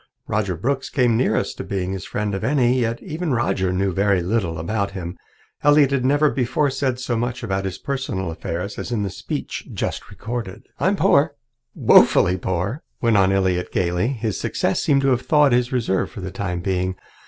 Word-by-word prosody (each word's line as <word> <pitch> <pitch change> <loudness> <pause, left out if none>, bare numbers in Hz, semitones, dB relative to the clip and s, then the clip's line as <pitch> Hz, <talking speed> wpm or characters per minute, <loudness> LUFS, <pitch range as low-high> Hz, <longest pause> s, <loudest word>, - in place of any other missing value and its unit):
Roger 100 -5 -1
Brooks 135 - -1
came 125 -4 +2
nearest 125 - 0
to - - -4
being 95 -1 -3
his 95 -3 -5
friend 105 -1 -2
of 95 - -3
any, 130 0 +2
yet 115 -1 -1
even 165 -3 -2
Roger 95 -5 0
knew 95 0 0
very 100 -1 +2
little 90 -4 -1
about 100 +5 -1
him. 90 -2 -5 0.5
Elliott 145 -2 +5
had 135 -2 +1
never 145 +3 +3
before 130 +3 0
said 130 -2 -1
so 125 -2 -2
much 120 +2 -2
about 95 -3 -2
his 95 -1 -4
personal 120 -11 -3
affairs 85 +4 -5
as - - -5
in 110 -4 0
the 100 - -3
speech - - -5
just - - -4
recorded. 115 -3 -6 0.2
"I'm 190 +3 +2
poor 145 -5 +3 0.4
woefully 90 +1 +5
poor," 95 - -2 0.2
went 115 -2 +2
on 95 -1 +4
Elliott 95 -2 +1
gaily. 90 +3 0
His 115 -5 -2
success - - 0
seemed 140 -2 +3
to 135 - +2
have 125 -1 +2
thawed 150 -1 +4
his 120 +1 +2
reserve 115 -7 0
for 100 - -9
the 95 0 -5
time 90 -3 -3
being. 95 0 -1
110 Hz, 190 wpm, -22 LUFS, 95-130 Hz, 0.5 s, Elliott